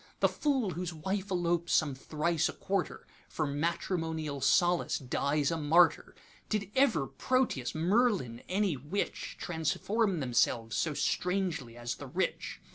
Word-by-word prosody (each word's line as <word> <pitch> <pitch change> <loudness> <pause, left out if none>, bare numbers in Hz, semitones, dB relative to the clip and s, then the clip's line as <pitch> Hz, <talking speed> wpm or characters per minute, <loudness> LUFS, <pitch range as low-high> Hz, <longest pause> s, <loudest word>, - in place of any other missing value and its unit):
The - - +5
fool 265 -9 0
whose 175 0 -4
wife 190 +5 -3
elopes 175 -2 0
some 150 -3 +2
thrice 155 +4 0
a - - -5
quarter, 195 0 -2 0.2
For 155 - -1
matrimonial 160 0 -2
solace 175 +5 +3
dies 140 +2 0
a 165 - -1
martyr. 160 +3 +3 0.3
Did 205 -2 -2
ever 235 - +3
Proteus, 160 - 0
Merlin, 175 - +1
any 190 -3 +1
witch, 145 +10 -4
Transform 180 +4 0
themselves 120 -3 +1
so 155 -3 0
strangely 180 -12 -1
as 120 0 -3
the - - -8
Rich? - - -2
170 Hz, 130 wpm, -31 LUFS, 145-195 Hz, 0.3 s, The